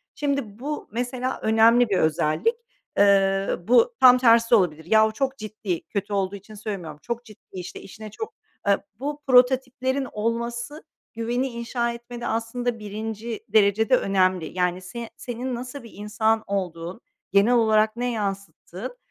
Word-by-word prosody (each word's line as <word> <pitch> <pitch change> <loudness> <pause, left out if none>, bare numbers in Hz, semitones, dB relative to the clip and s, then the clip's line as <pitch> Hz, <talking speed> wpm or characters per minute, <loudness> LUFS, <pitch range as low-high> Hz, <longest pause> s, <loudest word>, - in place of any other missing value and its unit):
Şimdi, 280 -8 -2
bu 295 +3 -4
mesela 250 +3 -3
önemli 225 +2 +5
bir 195 - +2
özellik. 155 - +1 0.4
Eee, 195 -1 +4
bu 460 - +5
tam 250 -1 +8
tersi 230 -2 +4
de - - +9
olabilir. 160 -6 +1
Yahu, 220 +4 +4
çok 270 +2 -1
ciddi, 215 -6 -4
kötü 205 0 -3
olduğu 195 0 0
için 200 +2 -12
söylemiyorum, 190 -8 -6
çok 235 0 -5
ciddi, 215 -3 -15
işte, 180 -2 -7
işine 215 +2 -10
çok, 440 - -6 0.3
eee, 200 -1 +5 0.2
bu 290 +2 -4
prototiplerin 260 +1 +3
olması 235 +6 -3 0.3
güveni 240 +3 -1
inşa 235 0 -2
etmede 235 0 -7
aslında 230 +1 -2
birinci 220 +2 -5
derecede 215 +4 +4
önemli. 185 -4 +1
Yani, 180 0 0
se 225 +5 -7
senin 245 +1 -4
nasıl 250 +2 -7
bir 230 - -12
insan 220 +2 0
olduğun, 180 0 -4 0.3
genel 200 +5 +4
olarak 220 -2 +3
ne 245 +1 -1
yansıttığın, 200 +2 -5
225 Hz, 145 wpm, -24 LUFS, 200-245 Hz, 0.4 s, de